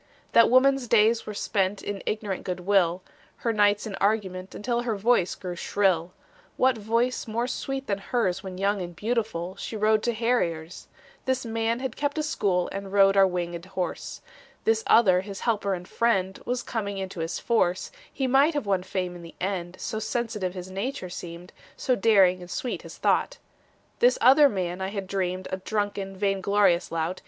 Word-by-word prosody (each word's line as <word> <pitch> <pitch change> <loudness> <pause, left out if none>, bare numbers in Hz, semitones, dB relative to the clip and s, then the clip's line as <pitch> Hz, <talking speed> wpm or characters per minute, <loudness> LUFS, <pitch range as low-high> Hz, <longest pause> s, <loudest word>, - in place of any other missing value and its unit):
That 230 - +6
woman's 260 +1 +4
days 225 0 +3
were 210 - -5
spent 195 -1 -1
In 200 -2 -4
ignorant 210 -3 -2
good 180 -1 -4
will, 185 -2 +2 0.3
Her 230 - -1
nights 205 0 +3
in 215 - -5
argument 195 -3 -1
Until 240 +2 -1
her 235 -3 -1
voice 205 -3 +2
grew 180 -2 -6
shrill. 180 -2 +1 0.5
What 260 -1 +3
voice 230 +4 0
more 230 +2 -1
sweet 270 +2 -4
than 200 -4 -1
hers 195 -4 -1
When 190 -2 -7
young 200 +1 0
and 175 -1 -6
beautiful, 205 -4 -2
She 220 - -5
rode 215 0 +3
to 240 - 0
harriers? 180 -9 -1 0.4
This 260 -1 0
man 225 +1 -1
had 265 -3 -3
kept 285 +1 -2
a 310 - 0
school 195 - 0
And 195 0 -6
rode 195 -1 +5
our 195 -1 +6
winged 175 -2 -3
horse. 185 -1 -5 0.4
This 225 0 +2
other 185 -6 +5
his 195 0 -8
helper 205 -4 0
and 180 0 -9
friend 190 -5 0
Was 245 0 -1
coming 200 -4 -3
into 190 -2 -5
his 165 +1 -2
force; 185 -6 0 0.2
He 270 - -2
might 275 +5 +4
have 290 - -1
won 195 -2 +1
fame 180 -1 -3
in 175 - -10
the 170 -1 -12
end, 185 -1 -3
So 220 - -3
sensitive 215 -5 -2
his 185 0 -7
nature 195 0 -4
seemed, 175 +1 -8 0.2
So 255 - +1
daring 195 -4 +4
and 175 - -10
sweet 245 +6 -3
his - - -11
thought. - - +1 0.6
This - - +4
other 285 - +7
man 185 -3 -3
I 190 - -1
had 200 -1 -4
dreamed 185 -1 -2
A 185 - -1
drunken, 200 -1 -3
vain 195 -1 0
glorious 195 -3 +2
lout. 165 +2 -2
200 Hz, 185 wpm, -26 LUFS, 185-230 Hz, 0.6 s, other